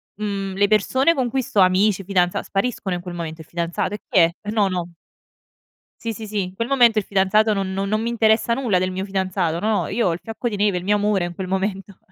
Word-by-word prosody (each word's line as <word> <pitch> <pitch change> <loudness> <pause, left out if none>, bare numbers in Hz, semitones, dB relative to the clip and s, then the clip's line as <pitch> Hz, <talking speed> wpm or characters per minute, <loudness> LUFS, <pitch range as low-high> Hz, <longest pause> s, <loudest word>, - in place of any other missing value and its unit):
mhmm, 200 -2 -3
le 200 +1 +3
persone 260 +9 +3
con 260 -5 -1
cui 265 +2 -1
sto 210 - -1
amici, 195 +2 +3
fidanza 180 -2 +1
spariscono 195 -2 -2
in 175 - -5
quel 180 0 -7
momento. 165 -2 -6
Il 160 - -14
fidanzato? 170 +3 -2
E 210 - -4
chi - - -3
è? 165 -1 +5 0.2
No, 210 -2 +2
no. 180 -2 -3 1.1
Sì, 230 -1 -3
sì, 220 0 -8
sì, 205 -1 -1
in 185 +1 -8
quel 230 +4 -3
momento 240 -5 +4
il 210 - +2
fidanzato 200 +3 +2
non 195 -2 -1
no 195 +1 -2
non 215 +2 0
mi 230 - -2
interessa 230 0 +2
nulla 230 -7 +1
del 185 0 0
mio 185 +1 -4
fidanzato, 185 -4 -1
no. 215 +2 0
Io 235 - 0
ho 170 - +1
il 165 - -5
fiocco 225 +2 -4
di 220 - -2
neve, 205 -2 +1
il 180 - -5
mio 205 +1 +3
amore 205 -3 +1
in 175 0 -7
quel 190 +1 -5
momento. 195 0 -3
195 Hz, 245 wpm, -21 LUFS, 185-215 Hz, 1.1 s, è